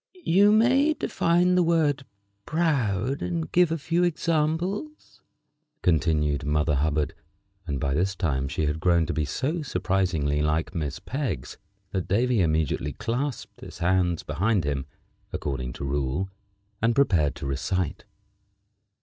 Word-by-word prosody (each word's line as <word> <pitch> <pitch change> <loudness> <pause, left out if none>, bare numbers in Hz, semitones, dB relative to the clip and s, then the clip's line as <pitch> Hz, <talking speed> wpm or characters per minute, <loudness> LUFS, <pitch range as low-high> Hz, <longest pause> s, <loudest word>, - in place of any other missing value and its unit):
"You 200 +5 +5
may 260 +8 +4
define 175 - +2
the 180 - +4
word 155 -5 +2 0.4
proud, 135 - 0
and 85 -3 -3
give 175 -2 +4
a 165 - 0
few 165 +4 0
examples," 170 - -1 0.6
continued 75 -3 +2
Mother 75 +1 +1
Hubbard; 75 +1 0 0.5
and 70 -4 -2
by 70 -2 0
this 95 +6 0
time 70 -7 -1
she 75 - -1
had 75 +1 -1
grown 85 -1 +3
to - - -2
be 75 - 0
so 150 - -2
surprisingly 90 - 0
like 75 +2 0
Miss 75 -4 -3
Peggs 120 - -4 0.3
that 95 -3 -2
Davy 120 +2 +2
immediately 80 -3 0
clasped 125 +3 -4
his - - -10
hands 90 -1 +1
behind 95 +6 0
him, 70 -2 -2 0.4
according 65 -3 -3
to 70 - -6
rule, 70 +7 -1 0.5
and 115 +1 +2
prepared 85 - +3
to - - -7
recite. 80 +6 -2
95 Hz, 135 wpm, -26 LUFS, -, 0.6 s, You